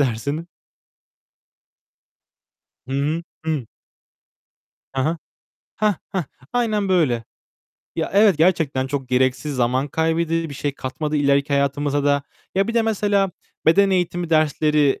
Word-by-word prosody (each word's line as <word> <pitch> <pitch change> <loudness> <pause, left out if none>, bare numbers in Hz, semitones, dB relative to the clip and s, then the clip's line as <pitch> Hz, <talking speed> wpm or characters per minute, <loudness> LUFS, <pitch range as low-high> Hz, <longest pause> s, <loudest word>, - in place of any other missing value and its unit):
dersin? 140 +6 -1 2.4
Hı 135 - -4
hı. 155 +4 -1 0.2
Hı. 155 -7 -1 1.3
He 135 - 0
he. 160 +5 0 0.6
Heh, 210 -1 +2 0.2
heh! 190 - +1 0.3
Aynen 215 -5 +1
böyle. 145 -11 +2 0.7
Ya, - - -1
evet, 200 -4 +5
gerçekten 160 -6 +2
çok 135 -1 -3
gereksiz 130 +3 +1
zaman 130 +3 +1
kaybedi 165 +1 0
Bir 140 - -7
şey 145 +1 -2
katmadı 150 +3 -3
ileriki 140 0 +2
hayatımıza 140 +1 +1
da. 140 0 +2 0.3
Ya, 195 +3 +2
bir 230 - -2
de 230 - +4
mesela 205 -3 +1 0.4
beden 195 +4 +5
eğitimi 175 -2 0
dersleri, 150 -2 +3
155 Hz, 120 wpm, -22 LUFS, 140-180 Hz, 2.4 s, evet